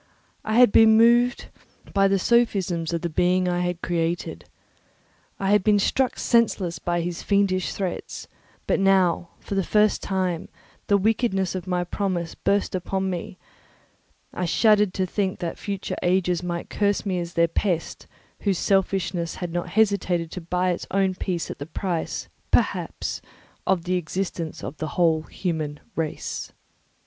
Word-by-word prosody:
I 215 - -1
had 245 -4 +7
before 225 - +7
been 220 0 +6
moved 240 +2 +4 0.4
by 195 0 +4
the 195 0 +2
sophisms 190 -7 +1
of 170 -1 -2
the 175 - -1
being 180 +3 +2
I 175 0 0
had 180 0 -2
created; 170 0 -2 0.9
I 195 0 0
had 205 -2 +4
been 210 0 +4
struck 255 +5 +1
senseless 210 -7 +1
by 175 0 -1
his 170 0 -4
fiendish 195 -2 +1
threats; 190 -3 -5 0.4
but - - +1
now, 185 -3 +3
for - - -7
the 195 -1 +1
first 210 +3 +2
time, 185 -3 -2 0.4
the 200 - +4
wickedness 200 -2 +1
of 185 -1 -5
my 180 -1 0
promise 175 -2 -2
burst 200 0 0
upon 190 +1 -1
me; 180 +1 -5 1.0
I 180 - -2
shuddered 210 +1 +3
to 190 - +1
think 190 +1 -1
that 175 -3 -5
future 200 -2 -4
ages 180 -1 +1
might 175 -1 -4
curse 205 0 0
me 185 -3 -1
as 170 0 -6
their 170 0 +4
pest, 170 0 -2 0.3
whose 195 -3 0
selfishness 185 -3 0
had 175 -2 -5
not 175 0 -2
hesitated 185 -5 +1
to 185 - -6
buy 180 +2 0
its 175 - -4
own 195 -1 +1
peace 180 -2 -3
at - - -9
the 145 - -6
price, 170 0 -3 0.2
perhaps, - - 0 0.5
of 185 -3 +2
the 180 +1 0
existence 175 -1 -4
of 155 - -6
the 155 - -3
whole 165 -3 +3
human 155 -3 -4 0.2
race. 160 -2 -4
185 Hz, 160 wpm, -24 LUFS, 175-200 Hz, 1.0 s, had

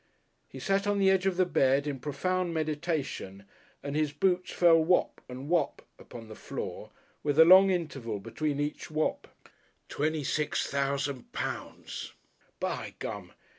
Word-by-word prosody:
He - - -10
sat 195 +1 0
on 205 0 +2
the 195 -1 +4
edge 190 0 +2
of 185 -2 0
the 185 - +4
bed 135 -4 +2
in 140 -3 -3
profound 170 +6 -1
meditation 150 - -3 0.4
and 140 0 -4
his 155 -1 +1
boots 180 +5 +1
fell 165 -2 +5
"whop" 180 +2 +2
and 130 +2 -7
"whop" 175 +1 0 0.2
upon 115 -2 -11
the 110 - -9
floor, - - -6 0.3
with 145 -1 -1
a 160 - +9
long 190 +3 +8
interval 140 - -2
between 140 +8 -3
each 145 +1 -3
"whop." 155 0 -1 0.6
Twenty 155 +1 -1
five 150 +2 -1
thousand 140 -1 -1
pounds. - - -5 0.5
"By - - -3
Gum!" - - -6
155 Hz, 150 wpm, -29 LUFS, 140-180 Hz, 0.6 s, a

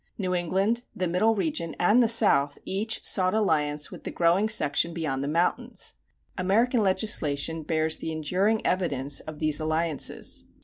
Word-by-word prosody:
New 185 -3 -2
England, 190 +7 0
the 185 - -1
Middle 215 +6 +2
Region, 210 - -2
and 210 +8 +4
the 235 - +4
South 200 -11 +3
each 215 +4 -2
sought 185 0 +2
alliance 150 -8 0
with - - -11
the - - -4
growing 175 +5 +2
section 165 -3 +1
beyond 140 -5 -2
the - - -3
mountains. 180 - -1 0.5
American 225 +6 +2
legislation 165 -6 +1
bears 155 0 0
the 160 - -5
enduring 185 +8 0
evidence 145 -7 -1
of 155 -1 -9
these 155 -1 +1
alliances. 155 -1 -2
175 Hz, 150 wpm, -26 LUFS, 155-210 Hz, 0.5 s, and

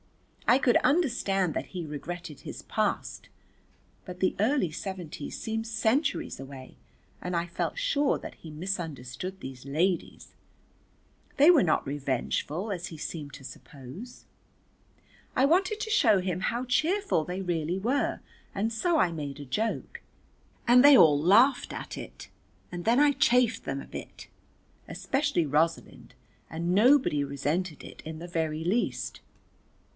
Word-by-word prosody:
I 240 - +6
could 255 -3 +4
understand 225 - +1
that - - -3
he 180 -3 -6
regretted 155 +1 -7
his - - -8
past, - - -2 0.7
but 180 0 -9
the 185 - +1
early 220 - +2
seventies 170 -3 -6
seemed 225 0 -3
centuries 225 - 0
away 135 -1 -10 0.5
and 180 -1 -2
I 170 - 0
felt 175 - -3
sure 300 - +1
that - - -9
he 160 - -12
misunderstood 165 -1 -5
these 130 -1 -9
ladies, 165 +6 -1 1.0
they 300 +4 +8
were 320 - +5
not 160 -4 +1
revengeful 145 - -2
as 175 -2 -4
he 160 - -9
seemed 150 -1 -6
to 140 -2 -12
suppose. 140 - -11 1.1
I 260 - +5
wanted 370 +7 +2
to 440 - -3
show 230 - +4
him 185 -1 -2
how 240 +4 -1
cheerful 310 - +1
they 180 +4 -4
really 175 -1 -1
were, 245 +9 0 0.3
and 220 +3 -1
so 340 +8 +1
I 180 - +3
made 145 -3 -5
a 145 - -7
joke 215 - -3 0.7
and 250 +2 +7
they 290 0 +9
an - - +9
laughed 190 - +4
at - - -6
it, - - -9 0.5
and 175 0 -5
then 235 +3 +4
I 290 0 +5
chaffed 250 -3 +3
them - - -3
a - - -10
bit, - - -9 0.6
especially 275 - 0
Rosalind, 160 +3 -1 0.3
and 170 +2 -2
nobody 240 - +4
resented 150 +5 -2
it - - -11
in 160 0 -7
the 175 - -7
very 160 -2 -2
least. 220 +7 -1
185 Hz, 145 wpm, -28 LUFS, 155-245 Hz, 1.1 s, they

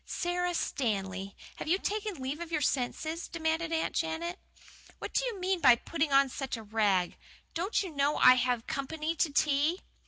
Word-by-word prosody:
"Sara 355 0 -1
Stanley, 195 - -2 0.2
have - - -6
you 350 +4 +3
taken 420 0 -2
leave 270 +1 -4
of 340 -1 -6
your 310 - +1
senses?" 310 +5 -1
demanded 320 0 -1
Aunt 325 0 0
Janet. 335 +2 -2 0.6
"What - - -7
do - - +2
you 460 -6 -3
mean 370 0 0
by 245 - +8
putting 310 +4 -2
on 275 0 +5
such 265 -1 -4
a 225 - -8
rig! 205 -4 +1 0.3
Don't 370 +5 0
you 370 - -6
know 280 +1 +2
I 255 - +8
have 250 -2 0
company 310 +4 -3
to 310 - +2
tea?" 295 +5 +2
310 Hz, 180 wpm, -30 LUFS, 255-340 Hz, 0.6 s, by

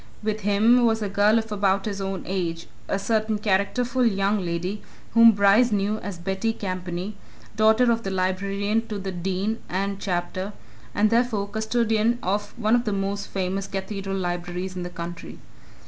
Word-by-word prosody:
With 215 0 -1
him 215 +5 +4
was 225 -1 +1
a 205 - -2
girl 205 +3 +4
of 225 -1 -2
about 195 -1 +1
his 200 -2 -3
own 195 -1 -3
age 170 -3 -2 0.2
a - - 0
certain 215 +1 0
characterful 225 +5 +1
young 200 -2 +2
lady 180 +4 -3 0.3
whom 230 0 +8
Bryce 205 +4 +4
knew 205 +1 0
as 200 -3 -6
Betty 190 +6 -1
Campany, 185 0 -4 0.4
daughter 220 +3 +4
of 230 0 +1
the 195 - -4
librarian 200 +4 0
to 215 -2 -4
the 195 -1 -4
Dean 190 +5 -2
and 195 +2 -2
Chapter 185 +2 -3 0.4
and 210 +1 +3
therefore 230 -4 +1
custodian 220 +1 +1
of 205 +4 -2
one 220 -1 +1
of 240 0 +3
the 210 - 0
most 200 +1 -2
famous 190 +1 -2
cathedral 195 0 -4
libraries 180 +1 -3
in 180 - -4
the 175 - -4
country. 175 -1 -7
200 Hz, 165 wpm, -24 LUFS, 190-220 Hz, 0.4 s, whom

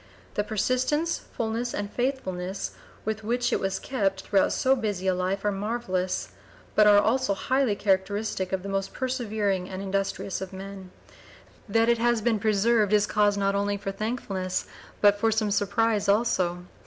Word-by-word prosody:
The 205 - 0
persistence, 255 +10 0 0.2
fulness, 230 +2 -2
and 205 0 -4
faithfulness 195 -8 -2 0.3
with 220 0 -2
which 245 +2 0
it - - +2
was 195 0 -1
kept 195 -7 -1
throughout 195 0 +2
so 265 +1 +3
busy 205 -6 -3
a 190 - +3
life 185 +2 -2
are 205 - +3
marvellous, 195 -3 -2 0.4
but 210 0 +5
are 205 -1 +7
also 225 -1 +2
highly 260 0 +1
characteristic 195 -1 0
of 190 -1 -1
the - - -5
most 195 0 -2
persevering 215 -8 -1
and 185 - -5
industrious 195 0 -2
of 190 0 -6
men. 190 0 -8 0.2
(p. - - -22 0.5
009) 225 +2 +3
That - - +1
it 235 -1 +3
has 240 0 +3
been 225 -2 +2
preserved 215 0 +2
is 210 -1 +5
cause 205 -1 +2
not 200 0 +1
only 200 0 0
for 195 -1 -4
thankfulness 195 -3 -3 0.4
but 205 0 +5
for 225 +1 +3
some 215 -1 +1
surprise 210 +1 +1
also. 180 -5 +1
205 Hz, 170 wpm, -26 LUFS, 195-225 Hz, 0.5 s, are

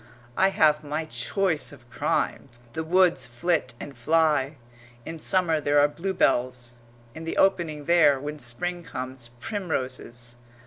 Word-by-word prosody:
I 190 - +4
have 155 -5 +3
my 150 +2 -3
choice 150 - 0
of 130 -4 -16
crimes. 120 -4 -2 0.2
The 160 - -3
woods 180 +2 +3
flit 130 0 -1
and 140 - -8
fly 150 +1 +2 0.5
in 165 0 -6
summer 165 -2 +2
there 145 0 +2
are 145 - +6
bluebells; 130 -8 0 0.4
in 160 - -8
the 165 - -4
opening 165 -6 +1
there, 160 -5 +5
when 150 +2 -6
Spring 175 +9 -3
comes, 130 -5 -6
primroses. 130 - -4
150 Hz, 135 wpm, -26 LUFS, 130-170 Hz, 0.5 s, are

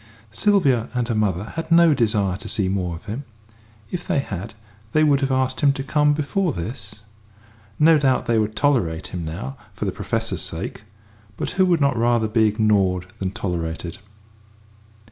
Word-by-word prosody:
Sylvia 130 - +2
and 120 -2 0
her - - +1
mother 100 -4 0
had 165 +9 -6
no 165 -1 +6
desire 105 -7 +1
to - - -8
see 100 -3 +1
more 90 -3 -1
of 85 - -12
him; 110 +7 -5 0.7
if 175 -1 -5
they 185 -5 +1
had, 110 -4 -4 0.4
they 155 - +4
would 145 -3 +4
have 135 -1 0
asked 130 0 0
him 145 -2 +5
to 135 - -4
come 150 +1 +2
before 155 +3 0
this. 105 +4 -6 0.8
No 160 0 +6
doubt 130 -3 +2
they 115 -2 +2
would 110 0 -1
tolerate 95 - 0
him 90 -2 -3
now 75 -4 -6 0.2
for - - -4
the - - 0
Professor's - - -2
sake; - - -5 0.6
but - - -3
who 185 0 +2
would 170 -3 +2
not 140 -2 +3
rather 120 -1 +2
be 110 0 +3
ignored 100 -4 +1
than 95 - -1
tolerated? 85 -3 -4
115 Hz, 175 wpm, -22 LUFS, 95-145 Hz, 0.8 s, no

